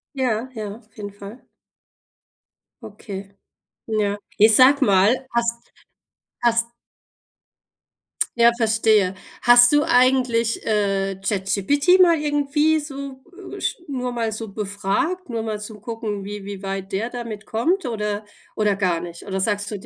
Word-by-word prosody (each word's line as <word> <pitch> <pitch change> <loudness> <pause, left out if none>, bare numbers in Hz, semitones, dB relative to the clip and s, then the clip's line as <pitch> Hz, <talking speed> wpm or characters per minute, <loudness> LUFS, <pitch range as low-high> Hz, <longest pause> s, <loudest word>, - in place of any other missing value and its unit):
Ja, 250 -2 -1
ja, 210 -2 -5
auf 225 -2 -25
jeden 205 -1 -6
Fall. 205 +4 -12 1.4
Okay, 200 -2 -8 0.6
ja. 210 -2 0 0.2
Ey, 215 - +7
sag 255 +5 +6
mal, 205 +7 +3
hast 235 0 -2 0.7
hast 235 -1 +3 1.7
Ja, 235 0 +6
verstehe. 220 -4 +2 0.3
Hast 240 0 +7
du 295 0 +4
eigentlich, 245 -3 +2
äh, 195 -2 0
ChatGPT 220 - +2
mal 340 -2 +5
irgendwie 295 +1 +1
so, 275 -2 -8 0.3
äh, - - -9
sch - - -1
nur 250 -3 -3
mal 230 -2 -2
so 220 0 -6
befragt, 210 - -2
nur 230 -2 -2
mal 220 -1 -3
zum 210 -1 -9
gucken, 215 -3 -5
wie 205 0 -7
wie 200 -1 -7
weit 195 0 -5
der 205 +5 -2
damit 230 -4 -7
kommt 330 - 0
oder 210 -3 -3 0.3
oder 210 -2 +2
gar 185 -4 0
nicht? 170 0 -9
Oder 190 -1 -3
sagst 205 +1 -1
du 205 - -5
d - - -15
220 Hz, 140 wpm, -22 LUFS, 205-250 Hz, 1.7 s, Ey